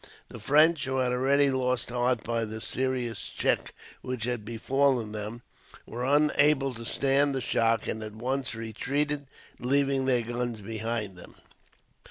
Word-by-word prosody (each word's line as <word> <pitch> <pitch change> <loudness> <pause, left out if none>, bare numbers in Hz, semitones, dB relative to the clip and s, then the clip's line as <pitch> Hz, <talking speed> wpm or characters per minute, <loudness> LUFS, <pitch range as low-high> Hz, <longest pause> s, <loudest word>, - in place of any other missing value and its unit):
The 120 - -9
French, 150 +6 +4
who 130 0 -1
had 130 -1 +1
already 135 +3 +3
lost 125 -2 0
heart 125 -1 +1
by 115 0 -1
the 110 0 -5
serious 125 -2 -2
check - - 0 0.3
which 125 -3 -4
had 120 -2 -2
befallen 120 +1 +1
them, 110 +3 -6 0.4
were 120 +2 -5
unable 145 0 +3
to 115 -1 -8
stand 140 +3 +2
the - - 0
shock, 115 -3 +1
and 110 - -2
at 110 -1 -7
once 130 +1 -2
retreated, 140 +6 -2 0.3
leaving 135 +1 +1
their 125 -3 +2
guns 120 -1 -3
behind 110 -2 -3
them. - - -13
125 Hz, 150 wpm, -28 LUFS, 115-135 Hz, 0.4 s, French